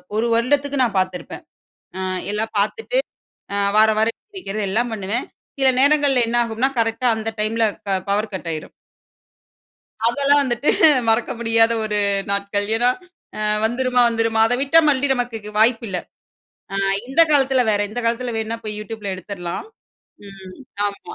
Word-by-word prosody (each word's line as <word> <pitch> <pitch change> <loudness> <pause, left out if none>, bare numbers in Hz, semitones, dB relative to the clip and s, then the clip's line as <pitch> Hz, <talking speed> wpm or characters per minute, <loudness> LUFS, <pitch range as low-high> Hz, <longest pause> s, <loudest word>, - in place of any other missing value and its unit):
1 225 - +1
வருடத்துக்கு 280 +3 +1
நான் 215 -5 0
பார்த்துருப்பேன் 185 -1 -4 0.6
ஆ - - -4 0.3
எல்லாம் 220 +1 -3
பார்த்துட்டு 450 - -1 0.8
வாரம் 220 0 +5
வாரம் 225 +1 +1 0.2
படிக்கிறது 215 - -4
எல்லாம் 235 +3 0
பண்ணுவேன். 210 +4 -3 0.3
சில 265 - +4
நேரங்கள்ல 285 -3 +3
என்ன 240 - 0
ஆகும்னா 230 +4 -1
கரெக்ட்டா 225 +2 -1
அந்த 220 0 -3
டைம்ல 225 +1 +1 0.2
க - - -3 0.2
பவர் 210 +1 -1
கட் 170 -2 -5
ஆயிரும். 155 -1 -6 1.4
அதெல்லாம் 285 +4 +3
வந்துட்டு 240 +2 -1 0.4
மறக்க 225 +2 +1
முடியாத 225 0 +3
ஒரு 210 -1 -1 0.3
நாட்கள். 200 0 -1
ஏனா 245 +1 +3 0.5
ஆ - - -3 0.2
வந்துருமா? 250 +1 +1
வந்துருமா? 225 -1 0
அத 235 - 0
விட்டா 285 +4 +5
மறுபடியும் 275 -1 +2
நமக்கு 230 -4 -4
வாய்ப்பு 230 +1 +3
இல்ல. 185 - -3 0.8
ஆ - - -1 0.3
இந்த 270 +6 +1
காலத்துல 270 -3 +3
வேற. 205 -1 +1
இந்த 245 - -4
காலத்துல 235 +1 -1
வேணுனா 225 +1 -2
போய் 210 -1 -4
YouTubeல 215 -1 -6
எடுத்துறலாம். 180 - -6 0.6
ம் 190 -2 -12 0.3
ஆமா, 200 0 -7
225 Hz, 145 wpm, -20 LUFS, 210-255 Hz, 1.4 s, வாரம்